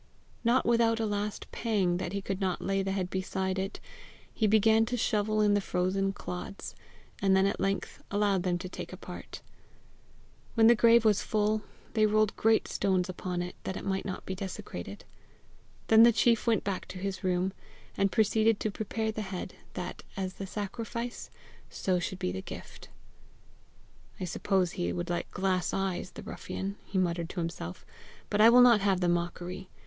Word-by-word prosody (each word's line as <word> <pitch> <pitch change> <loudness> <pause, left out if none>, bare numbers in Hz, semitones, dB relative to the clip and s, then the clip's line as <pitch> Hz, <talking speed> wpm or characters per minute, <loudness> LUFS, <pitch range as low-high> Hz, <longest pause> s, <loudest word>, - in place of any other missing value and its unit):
Not 240 +2 +3
without 230 -1 +3
a 225 - +1
last 205 0 -2
pang 195 -7 +1
that 175 - -3
he 200 0 -3
could 195 0 -3
not 185 -2 0
lay 195 0 +1
the 195 0 -2
head 185 -2 -2
beside 190 0 -1
it, 195 +1 -4 0.5
he 220 - +1
began 220 +1 +5
to 245 - -1
shovel 215 -1 +1
in 205 -1 +4
the 205 - +3
frozen 190 +2 0
clods, 195 0 -6 0.5
and 195 -1 +4
then 190 0 +4
at 200 - 0
length 195 0 -2
allowed 205 -2 +2
them 175 -1 0
to 185 +1 -6
take 185 - -7
a - - -8
part. - - -9 1.1
When 225 -2 +5
the 235 - +9
grave 235 0 +5
was 210 -2 +4
full, 215 0 +1 0.3
they 215 -1 +4
rolled 215 0 +2
great 225 0 +3
stones 190 -2 0
upon 180 -1 -3
it, 180 - -6
that 190 - -3
it - - -7
might 190 -1 -1
not 185 - -5
be 190 - -3
desecrated. 140 - -7 0.8
Then 220 0 +7
the 235 +1 +9
chief 230 +1 +2
went 225 -2 +3
back 195 -2 -3
to - - -8
his 195 +1 -4
room, 185 +1 +1 0.4
and 195 -1 +2
proceeded 220 0 +3
to 215 - 0
prepare 220 +1 -2
the 215 - -4
head, 190 -2 -5 0.2
that, 180 -2 -5 0.2
as 190 -1 -2
the 195 - -6
sacrifice, 230 +4 -5 0.4
so 185 -2 0
should 185 +1 -3
be 90 - -2
the 95 +1 -4
gift. - - -10 1.3
"I - - -4
suppose 185 0 0
he 85 0 -2
would 85 - -3
like 175 - -2
glass 185 -1 0
eyes, 190 -1 -2
the - - -10
ruffian!" 195 +1 -5
he 195 - -3
muttered 170 -2 0
to 185 - -5
himself, 165 - -5 0.5
"but 205 - +3
I 225 - +9
will 245 +1 +8
not 240 -4 +7
have 195 -2 +2
the 180 - +1
mockery. 175 +2 -2
195 Hz, 185 wpm, -30 LUFS, 185-215 Hz, 1.3 s, the